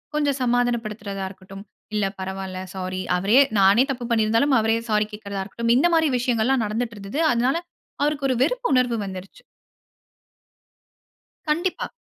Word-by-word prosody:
கொஞ்சம் 285 -2 +1
சமாதானப்படுத்துறதா 225 -5 -1
இருக்கட்டும், 195 +1 -12 0.3
இல்ல 210 -2 +1
பரவால, 190 0 -5 0.2
சாரி. 185 0 -4 0.2
அவரே 205 +8 +4 0.2
நானே 195 +5 +6
தப்பு 245 -2 -5
பண்ணி 220 -2 +3
இருந்தாலும் 230 +6 +2
அவரே 225 +1 +2
சாரி 210 0 +2
கேட்கிறதா 200 -2 -5
இருக்கட்டும், 230 +4 0
இந்த 290 +8 +4
மாரி 320 -2 +3
விஷயங்கள்லாம் 245 +1 +1
நடந்துட்டுருந்தது. 220 +2 -4
அதனால 245 +5 +1 0.5
அவருக்கு 290 -2 0
ஒரு 255 - +2
வெறுப்பு - - -1
உணர்வு 250 -2 +2
வந்துருச்சு. 190 0 -9 2.1
கண்டிப்பா. 345 +4 -1
225 Hz, 130 wpm, -23 LUFS, 195-255 Hz, 2.1 s, நானே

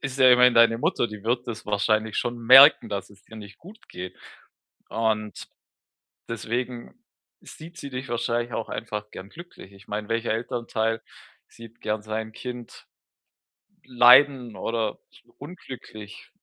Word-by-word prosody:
ist 135 -1 -5
ja 130 -1 +7
immerhin 125 0 +6
deine 115 0 +5
Mutter, 155 -5 0
die 105 -2 -10
wird 120 +2 -1
das 110 -2 -7
wahrscheinlich 110 +1 0
schon 120 0 -3
merken, 130 +1 +7
dass 100 -1 -5
es 100 0 -20
dir 110 - -14
nicht 100 -2 -12
gut 210 +6 -16
geht. 90 0 -8 0.7
Und 110 -2 -3 0.8
deswegen 120 - -5 0.5
sieht 170 +2 -13
sie 140 - -8
dich 130 +1 -6
wahrscheinlich 120 0 -2
auch 110 - -4
einfach 105 -1 -6
gerne 95 +1 -10
glücklich. 170 - -14
Ich 100 +1 -19
meine, 105 0 -5
welcher 115 0 -1
Elternteil 115 -1 -3 0.5
sieht 115 0 -15
gerne 105 0 -3
sein 110 +1 -5
Kind 125 0 -9 1.0
leiden 125 -1 +5
oder 110 +2 -3 0.4
unglücklich? 130 - -11
115 Hz, 140 wpm, -24 LUFS, 110-125 Hz, 1.0 s, ja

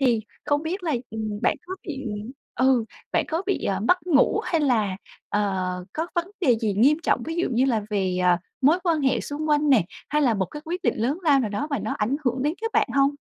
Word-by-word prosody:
Thì 245 -5 +3 0.2
không 290 0 +1
biết 355 +4 -3
là 330 -3 -1 0.2
,ừm, 215 -1 -4
bạn - - +2
có 370 - -4
bị 275 -3 -5 0.5
ừ, 255 -2 +3 0.3
bạn - - +2
có 325 +3 -1
bị, 395 - -1
ờ, 195 -1 0
mất 360 - +2
ngủ 305 -6 +4
hay 330 - +1
là, 220 -9 +1 0.3
ờ, 185 -3 -1
có 320 +2 -2
vấn 345 +2 -1
đề 255 -10 +4
gì 215 -4 0
nghiêm 265 +9 +5
trọng - - +1
ví 325 - -4
dụ 350 - +1
như 245 +2 +3
là 235 -5 +1
về, 190 -3 0
ờ, 180 -1 +5 0.2
mối 300 +6 +5
quan 330 -3 +2
hệ 265 -1 +2
xung 300 +2 -4
quanh 295 0 +3
nè, 245 -10 +5 0.2
hay 300 0 +1
là 245 -5 +3
một 195 -2 0
cái 295 +11 -9
quyết 350 +3 -4
định - - +2
lớn 255 +9 0
lao 290 -5 +4
nào 220 -5 -2
đó 240 +9 -2
mà 280 - 0
nó - - -3
ảnh 220 +6 +1
hưởng 255 0 0
đến 300 +3 +1
các 455 0 -2
bạn - - +2
hông? 275 0 +4
270 Hz, 245 wpm, -24 LUFS, 215-310 Hz, 0.5 s, nghiêm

